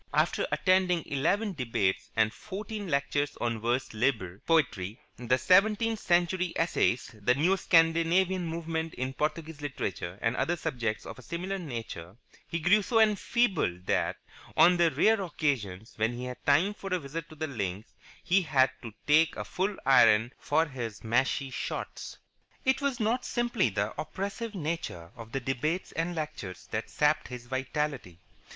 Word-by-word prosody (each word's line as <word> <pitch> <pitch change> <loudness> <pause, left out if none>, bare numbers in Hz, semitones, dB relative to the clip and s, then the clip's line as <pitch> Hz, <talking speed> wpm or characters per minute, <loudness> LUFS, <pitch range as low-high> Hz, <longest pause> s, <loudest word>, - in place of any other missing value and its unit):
After - - +2
attending 185 -3 +2
eleven 195 +10 0
debates 115 - -1
and 110 -1 +2
fourteen 210 0 -6
lectures 145 -1 0
on 115 -2 -1
vers 120 +3 -1
libre 105 -6 0
Poetry, 115 - +1 0.2
the 125 +1 +1
Seventeenth 210 - +3
Century 175 0 +1
Essayists, 165 -7 +1
the 125 +5 +3
Neo 170 +8 +3
Scandinavian 170 +1 +3
Movement 160 0 -3
in 130 +1 -3
Portuguese 155 +1 -3
Literature, 95 -10 -4
and 115 +2 0
other 175 - 0
subjects 115 -8 -3
of - - -8
a - - -10
similar 185 +8 -4
nature, 115 - -6 0.3
he 165 - -2
grew 175 +6 +4
so 225 +3 +1
enfeebled 205 - +2
that, - - +1 0.4
on 175 +1 +7
the 170 -1 +4
rare 200 +9 +3
occasions 120 - -2
when 110 +2 +1
he 120 +1 -6
had 125 0 -7
time 165 +9 +4
for 195 -2 -8
a 185 - +2
visit 165 +1 -6
to 155 - -12
the 155 +1 -3
links, 105 -7 -4 0.3
he 185 +2 +3
had 135 -6 +3
to 115 -3 -8
take 155 +2 +4
a - - -5
full 195 +2 -2
iron 120 -3 +5
for 160 +2 +2
his 120 -8 -6
mashie 130 +4 +1
shots. - - -5 0.5
It 265 +2 +2
was 275 -3 -1
not 230 +3 +1
simply 240 - 0
the 100 +2 -2
oppressive 200 +7 -5
nature 155 - -4
of 115 -2 -10
the 135 - -1
debates 135 +8 -2
and 165 +2 -2
lectures 130 - -6
that - - -3
sapped 150 +1 +2
his 125 -1 -8
vitality. 135 - -3
150 Hz, 160 wpm, -29 LUFS, 120-180 Hz, 0.5 s, on